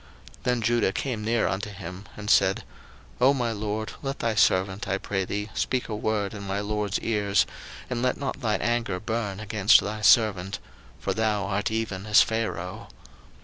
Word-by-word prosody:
01:044:018 -, -, -26 dB
Then 125 Hz, -1 st, +1 dB
Judah 120 Hz, -3 st, +2 dB
came 120 Hz, -4 st, -3 dB
near 115 Hz, +1 st, +1 dB
unto 95 Hz, +2 st, -2 dB
him, 95 Hz, 0 st, -8 dB
and 105 Hz, -1 st, -7 dB
said, 95 Hz, 0 st, +4 dB, 0.6 s
Oh 135 Hz, +3 st, +6 dB
my 120 Hz, -3 st, 0 dB
lord, 105 Hz, 0 st, -3 dB
let 135 Hz, 0 st, -3 dB
thy 115 Hz, -1 st, 0 dB
servant, 95 Hz, 0 st, +2 dB
I 95 Hz, +1 st, 0 dB
pray 95 Hz, -1 st, -2 dB
thee, 105 Hz, +3 st, -4 dB
speak 130 Hz, -1 st, -1 dB
a 110 Hz, -, -2 dB
word 105 Hz, -2 st, -1 dB
in 105 Hz, -, -7 dB
my 100 Hz, 0 st, -2 dB
lord's 105 Hz, 0 st, -1 dB
ears, 100 Hz, -4 st, +2 dB, 0.4 s
and 120 Hz, -1 st, -2 dB
let 125 Hz, 0 st, +1 dB
not 140 Hz, 0 st, -4 dB
thine 110 Hz, -3 st, 0 dB
anger 120 Hz, -5 st, 0 dB
burn 110 Hz, -2 st, -3 dB
against 105 Hz, 0 st, +5 dB
thy 105 Hz, +1 st, -4 dB
servant: 100 Hz, -4 st, +4 dB, 0.4 s
for -, -, -1 dB
thou 105 Hz, -3 st, 0 dB
art 100 Hz, +1 st, -1 dB
even 110 Hz, -3 st, -3 dB
as 105 Hz, 0 st, +7 dB
Pharaoh. 110 Hz, -5 st, -3 dB
105 Hz, 180 wpm, -26 LUFS, 100-115 Hz, 0.6 s, as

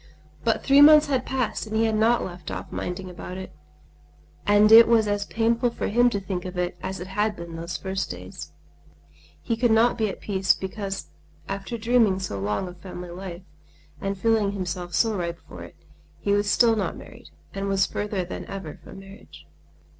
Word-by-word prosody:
But 225 Hz, -, +1 dB
three 280 Hz, +1 st, +6 dB
months 300 Hz, 0 st, +9 dB
had 265 Hz, -3 st, -1 dB
passed 255 Hz, -4 st, -2 dB
and 215 Hz, -, -5 dB
he 225 Hz, +1 st, +3 dB
had 220 Hz, -, +1 dB
not 225 Hz, +2 st, +3 dB
left 175 Hz, -1 st, -8 dB
off -, -, -6 dB
minding 180 Hz, +1 st, -4 dB
about 180 Hz, +1 st, -8 dB
it; 190 Hz, -, -8 dB, 1.0 s
and 205 Hz, +1 st, +5 dB
it 225 Hz, +1 st, +10 dB
was 225 Hz, -2 st, +4 dB
as 205 Hz, 0 st, -1 dB
painful 230 Hz, +2 st, +1 dB
for 235 Hz, -, -3 dB
him 240 Hz, +3 st, +4 dB
to 205 Hz, -, -2 dB
think 190 Hz, -2 st, -4 dB
of 185 Hz, 0 st, -7 dB
it 180 Hz, 0 st, -1 dB
as 190 Hz, 0 st, -4 dB
it 180 Hz, -, -6 dB
had 210 Hz, +2 st, -1 dB
been 170 Hz, -2 st, -8 dB
those 170 Hz, +2 st, -5 dB
first 190 Hz, 0 st, -3 dB
days. -, -, -8 dB, 0.9 s
He 230 Hz, -, 0 dB
could 240 Hz, +1 st, +2 dB
not 225 Hz, +2 st, +3 dB
be 215 Hz, -1 st, +1 dB
at -, -, -7 dB
peace 190 Hz, -2 st, +1 dB
because 195 Hz, 0 st, -5 dB, 0.4 s
after 195 Hz, +4 st, -4 dB
dreaming 225 Hz, -3 st, +3 dB
so 185 Hz, -, -4 dB
long 105 Hz, -, -2 dB
of 180 Hz, 0 st, -10 dB
family 180 Hz, -2 st, -8 dB
life, 180 Hz, 0 st, -8 dB, 0.6 s
and 195 Hz, 0 st, -2 dB
feeling 215 Hz, -1 st, +2 dB
himself 180 Hz, -2 st, -4 dB
so 225 Hz, -2 st, +2 dB
ripe 170 Hz, -2 st, -3 dB
for -, -, -10 dB
it, -, -, -11 dB, 0.4 s
he 200 Hz, -, -1 dB
was 205 Hz, 0 st, +2 dB
still 230 Hz, 0 st, +4 dB
not 210 Hz, -, -2 dB
married, -, -, -13 dB, 0.2 s
and 195 Hz, 0 st, -3 dB
was 195 Hz, -1 st, +2 dB
further 205 Hz, -3 st, -3 dB
than 175 Hz, -, -7 dB
ever 190 Hz, -4 st, -7 dB
from -, -, -12 dB
marriage. 195 Hz, +2 st, -14 dB
200 Hz, 195 wpm, -25 LUFS, 185-225 Hz, 1.0 s, it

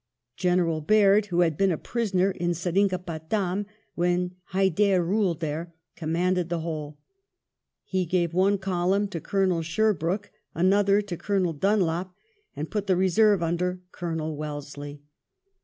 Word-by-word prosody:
General 175 Hz, -3 st, +1 dB
Baird, 205 Hz, +4 st, +4 dB
who 175 Hz, -2 st, +1 dB
had 165 Hz, -3 st, +2 dB
been 195 Hz, +3 st, +2 dB
a 165 Hz, -, 0 dB
prisoner 195 Hz, -4 st, 0 dB
in 175 Hz, -2 st, -1 dB
Seringapatam 185 Hz, +1 st, -1 dB, 0.3 s
when 180 Hz, +1 st, 0 dB
Hyder 190 Hz, 0 st, +2 dB
ruled 185 Hz, -3 st, 0 dB
there, 160 Hz, +2 st, -4 dB, 0.2 s
commanded 175 Hz, +2 st, 0 dB
the 170 Hz, -1 st, -1 dB
whole. 155 Hz, -3 st, -5 dB, 0.9 s
He 185 Hz, -2 st, -1 dB
gave 170 Hz, -1 st, 0 dB
one 195 Hz, +3 st, +3 dB
column 190 Hz, +1 st, 0 dB
to 170 Hz, -5 st, -5 dB
Colonel 190 Hz, -4 st, +1 dB
Sherbrooke, 195 Hz, +2 st, 0 dB, 0.2 s
another 200 Hz, +3 st, +3 dB
to 185 Hz, -4 st, -6 dB
Colonel 185 Hz, -1 st, 0 dB
Dunlop, 180 Hz, 0 st, 0 dB, 0.4 s
and 155 Hz, +2 st, -5 dB
put 210 Hz, -2 st, -2 dB
the 190 Hz, -, +3 dB
reserve 190 Hz, +1 st, +3 dB
under 180 Hz, +2 st, -1 dB
Colonel 160 Hz, -3 st, -3 dB
Wellesley. 145 Hz, -1 st, -7 dB
180 Hz, 130 wpm, -26 LUFS, 165-195 Hz, 0.9 s, Baird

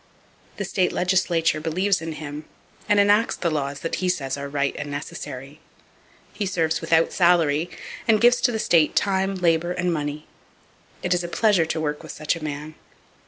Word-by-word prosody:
The -, -, -3 dB
state 185 Hz, -2 st, +1 dB
legislature 175 Hz, -3 st, +1 dB
believes 185 Hz, +5 st, 0 dB
in 160 Hz, 0 st, -4 dB
him, 150 Hz, 0 st, -7 dB, 0.4 s
and 205 Hz, -1 st, +4 dB
enacts 205 Hz, +3 st, +4 dB
the 170 Hz, -, -1 dB
laws 140 Hz, -2 st, -3 dB
that 165 Hz, -, -2 dB
he 185 Hz, -, 0 dB
says 135 Hz, -7 st, -1 dB
are 140 Hz, 0 st, -6 dB
right 140 Hz, -1 st, -1 dB
and 145 Hz, -, -5 dB
necessary. 145 Hz, 0 st, -7 dB, 0.7 s
He 205 Hz, -, -2 dB
serves 165 Hz, -4 st, 0 dB
without 165 Hz, 0 st, +2 dB
salary, 170 Hz, -3 st, +3 dB, 0.4 s
and 220 Hz, -2 st, +4 dB
gives 240 Hz, +2 st, +5 dB
to -, -, +3 dB
the 225 Hz, -, -1 dB
state 165 Hz, -7 st, +3 dB
time, 195 Hz, 0 st, +1 dB
labor 175 Hz, -1 st, +1 dB
and 175 Hz, 0 st, -1 dB
money. 150 Hz, -1 st, -4 dB, 0.8 s
It 180 Hz, -, +2 dB
is 175 Hz, 0 st, 0 dB
a -, -, -3 dB
pleasure 190 Hz, -3 st, +2 dB
to 160 Hz, -, -2 dB
work 150 Hz, -1 st, -2 dB
with -, -, -8 dB
such 155 Hz, +2 st, -1 dB
a 165 Hz, -, -8 dB
man. 150 Hz, +1 st, -5 dB
165 Hz, 180 wpm, -23 LUFS, 150-185 Hz, 0.8 s, gives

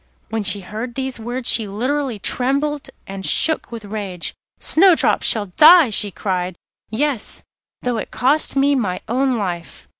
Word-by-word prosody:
When 225 Hz, 0 st, -2 dB
she 200 Hz, 0 st, -2 dB
heard 220 Hz, +6 st, -7 dB
these 265 Hz, -2 st, -3 dB
words 240 Hz, +2 st, -3 dB
she 220 Hz, -3 st, +3 dB
literally 255 Hz, +4 st, -2 dB
trembled 275 Hz, +7 st, -1 dB, 0.2 s
and 195 Hz, 0 st, -8 dB
shook 315 Hz, +8 st, +2 dB
with 230 Hz, -3 st, -8 dB
rage. 200 Hz, -4 st, -5 dB, 0.3 s
'Snowdrop 355 Hz, +1 st, +3 dB
shall 215 Hz, -4 st, +2 dB
die,' 310 Hz, -4 st, +8 dB
she 205 Hz, 0 st, +3 dB
cried; 185 Hz, -2 st, -3 dB, 0.3 s
'yes, 255 Hz, +1 st, -2 dB, 0.4 s
though 245 Hz, -2 st, -1 dB
it -, -, -5 dB
cost 280 Hz, +6 st, +1 dB
me 280 Hz, +1 st, +3 dB
my 200 Hz, -9 st, -2 dB
own 255 Hz, +1 st, 0 dB
life. 175 Hz, -5 st, -6 dB
235 Hz, 150 wpm, -19 LUFS, 205-275 Hz, 0.4 s, die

